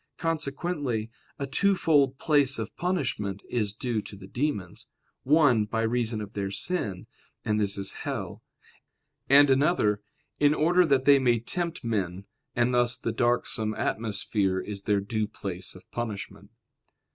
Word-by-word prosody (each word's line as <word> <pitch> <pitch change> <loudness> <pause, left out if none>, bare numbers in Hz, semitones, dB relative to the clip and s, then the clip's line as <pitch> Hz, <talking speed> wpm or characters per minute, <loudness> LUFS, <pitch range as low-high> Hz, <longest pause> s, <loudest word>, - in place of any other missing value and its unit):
Consequently 145 -7 -2 0.3
a 140 - -3
twofold 145 -3 +2
place 145 -3 +3
of 110 -1 -5
punishment 105 - -2
is 110 -4 0
due 110 +1 -2
to 100 - -10
the 95 -1 -11
demons: 110 - -3 0.3
one, 135 -7 +4
by 115 +1 -1
reason 115 -1 0
of 105 +1 -8
their 100 -1 -2
sin, 100 - -2 0.4
and 105 0 +1
this 100 -1 0
is 100 0 -1
hell; - - -4 0.9
and 140 +1 +7
another, 130 -7 +2 0.4
in 145 0 +4
order 175 +3 +4
that 135 -3 +2
they 140 -1 +7
may 120 -3 +3
tempt 170 +7 -3
men, 100 -5 -2 0.3
and 120 +1 +2
thus 120 0 +2
the 115 - -2
darksome 115 -2 0
atmosphere 100 -3 0
is 100 0 -5
their 100 -2 +2
due 110 +1 -2
place 95 -4 -6
of 90 - -13
punishment. 100 -3 -5
120 Hz, 145 wpm, -27 LUFS, 105-140 Hz, 0.9 s, and